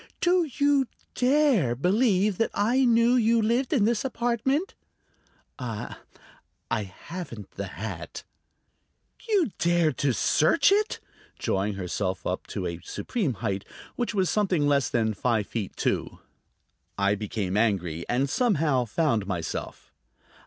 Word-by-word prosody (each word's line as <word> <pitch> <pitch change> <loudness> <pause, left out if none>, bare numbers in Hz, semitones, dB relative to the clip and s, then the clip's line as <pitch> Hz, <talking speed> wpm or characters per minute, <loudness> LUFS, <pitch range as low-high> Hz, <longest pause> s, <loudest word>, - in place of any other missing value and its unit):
"Do 350 -2 +2
you 285 -2 +3 0.3
dare 255 - +3
believe 195 - +2
that 225 - +2
I 245 +6 +3
knew 235 0 +4
you 230 -1 +3
lived 235 +4 +1
in 240 -9 +3
this 225 -1 +1
apartment?" 265 - -1 0.9
"I... 115 -5 -5 0.8
haven't 110 - -5
the - - -5
hat." - - -7 1.1
"You 385 - +2
dared 170 -2 +2
to 140 - +2
search - - +3
it?" 420 +2 +1 0.4
drawing 100 +1 -1
herself 95 0 -3
up - - -3
to 95 - -4
a 85 -1 -4
supreme 185 - -2
height, 100 -1 -1 0.3
which 240 -3 -2
was 190 -2 +2
something 185 -8 +1
less 140 -3 +2
than 110 -2 +1
five 110 0 0
feet 105 -4 -5
two. - - -1 0.8
I 100 0 +2
became 100 -2 -3
angry, 90 -7 0
and 130 +3 +1
somehow 150 - +1
found 115 -5 0
myself. 90 -5 -5
170 Hz, 125 wpm, -26 LUFS, -, 1.1 s, knew